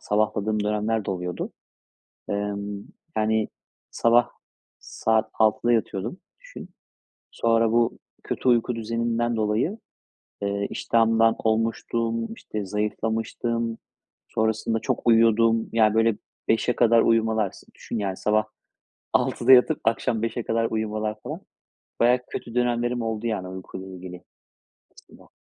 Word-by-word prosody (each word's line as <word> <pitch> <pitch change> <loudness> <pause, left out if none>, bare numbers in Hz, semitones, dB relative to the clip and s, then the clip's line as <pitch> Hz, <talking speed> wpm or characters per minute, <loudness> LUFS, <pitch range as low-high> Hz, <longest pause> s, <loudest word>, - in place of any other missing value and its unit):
sabahladığım 105 0 0
dönemler 105 0 0
de - - -2
oluyordu. 90 -1 -4 0.8
Emm, 100 0 -3 0.3
yani, 110 0 +1 0.4
sabah 120 0 +3 0.5
saat 110 0 0
6.00'da 110 +2 +2
yatıyordum, 115 - -1 0.2
düşün. - - -11 0.6
Sonra 115 -1 +2
bu 120 0 +2 0.3
kötü 130 - -1
uyku 120 0 +2
düzeninden 115 +1 -1
dolayı, 110 - 0 0.6
eee, 100 0 -1
iştahımdan 115 0 +3
olmuştum, 115 +1 -1
işte, 105 -2 -6
zayıflamıştım, 110 +3 -2 0.5
sonrasında 110 +1 0
çok - - -2
uyuyordum. 115 0 +4
Yani, 110 -1 +4
böyle, 115 -1 +3 0.3
5.00'e 115 +2 +2
kadar 115 -1 +5
uyumalar 110 -3 +2
s - - -15
düşün, 115 - -5
yani, 95 -2 -2
sabah 110 0 +1 0.7
6.00'da 125 +3 +2
yatıp 130 +4 +6
akşam 115 0 0
5.00'e 115 0 -2
kadar 115 0 0
uyumalar 110 -1 -2
falan. - - -6 0.6
Bayağı 125 +1 +4
kötü 115 0 -6
dönemlerim 120 0 +1
oldu, 115 0 -2
yani, 100 -5 -2
uykuyla 95 0 -8
ilgili 90 -1 -9 0.7
aslında. - - -18
115 Hz, 115 wpm, -25 LUFS, 105-115 Hz, 0.8 s, yatıp